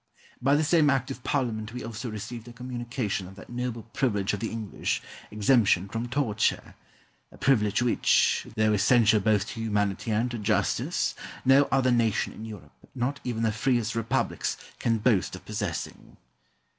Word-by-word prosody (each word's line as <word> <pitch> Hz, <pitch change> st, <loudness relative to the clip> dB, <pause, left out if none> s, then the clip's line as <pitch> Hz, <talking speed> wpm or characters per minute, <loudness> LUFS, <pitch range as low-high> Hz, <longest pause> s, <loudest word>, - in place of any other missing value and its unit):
By 135 Hz, +3 st, +4 dB
the 155 Hz, -, +2 dB
same 155 Hz, -1 st, +4 dB
Act 135 Hz, -3 st, +1 dB
of 125 Hz, -, -8 dB
Parliament 115 Hz, -5 st, -1 dB
we 125 Hz, -, -5 dB
also 115 Hz, +2 st, -5 dB
received 110 Hz, +2 st, -7 dB
a 120 Hz, -, -10 dB
communication 120 Hz, -5 st, -3 dB
of 95 Hz, -, -12 dB
that 100 Hz, -, -12 dB
noble 120 Hz, -2 st, -3 dB
privilege 115 Hz, -6 st, -1 dB
of 105 Hz, -, -2 dB
the 115 Hz, -, -2 dB
English, 110 Hz, -3 st, -2 dB, 0.3 s
exemption 105 Hz, -3 st, +3 dB
from 115 Hz, +4 st, -4 dB
torture 120 Hz, -6 st, 0 dB, 0.6 s
a -, -, -15 dB
privilege 120 Hz, -5 st, +2 dB
which, 120 Hz, -, +3 dB
though 110 Hz, 0 st, +3 dB
essential 110 Hz, +1 st, +4 dB
both 105 Hz, 0 st, +2 dB
to 115 Hz, -, -7 dB
humanity 105 Hz, -1 st, -1 dB
and 115 Hz, +3 st, +1 dB
to 120 Hz, -, -4 dB
justice, 65 Hz, -, 0 dB, 0.3 s
no 135 Hz, +2 st, +6 dB
other 130 Hz, -1 st, +3 dB
nation 115 Hz, -3 st, +1 dB
in 110 Hz, -, -8 dB
Europe, 100 Hz, -9 st, -10 dB, 0.2 s
not 130 Hz, +3 st, -1 dB
even 115 Hz, -2 st, -2 dB
the 110 Hz, -, +2 dB
freest 120 Hz, 0 st, 0 dB
republics, 115 Hz, 0 st, -1 dB, 0.2 s
can 115 Hz, -1 st, +1 dB
boast 105 Hz, -5 st, +1 dB
of 95 Hz, -, -12 dB
possessing. 100 Hz, -5 st, -5 dB
115 Hz, 165 wpm, -27 LUFS, 105-125 Hz, 0.6 s, no